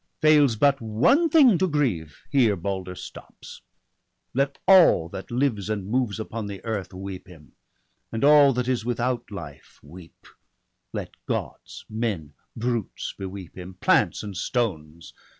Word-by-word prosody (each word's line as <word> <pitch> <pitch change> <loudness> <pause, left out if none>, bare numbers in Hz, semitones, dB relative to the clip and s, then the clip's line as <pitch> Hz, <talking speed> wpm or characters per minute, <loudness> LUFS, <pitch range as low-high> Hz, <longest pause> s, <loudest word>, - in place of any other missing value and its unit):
Fails 150 -5 +5
but 140 +4 +2
one 120 - +3
thing 270 - +5
to 190 - +2
grieve, 120 - -1
here 120 -7 +3
Balder 95 0 -4
stops! - - -11 0.7
Let 140 +2 0
all 175 - +6
that 95 - -8
lives 120 -5 -1
and 105 -3 -2
moves 115 0 -1
upon 110 0 -5
the 100 -1 -7
earth 105 -5 -3
Weep 95 -1 -8
him, 80 -5 -16 0.6
and 115 +2 -3
all 145 -1 +7
that 125 0 -2
is 125 -3 0
without 120 0 -2
life 85 -9 -10
weep; 85 +3 -15 0.7
Let - - -5 0.2
Gods, - - -5
men, 105 -10 -3 0.2
brutes, 120 -2 -3
beweep 95 -2 -8
him; 90 0 -9
plants - - +2
and 100 -2 -7
stones 85 - -3
110 Hz, 140 wpm, -24 LUFS, 95-130 Hz, 0.7 s, all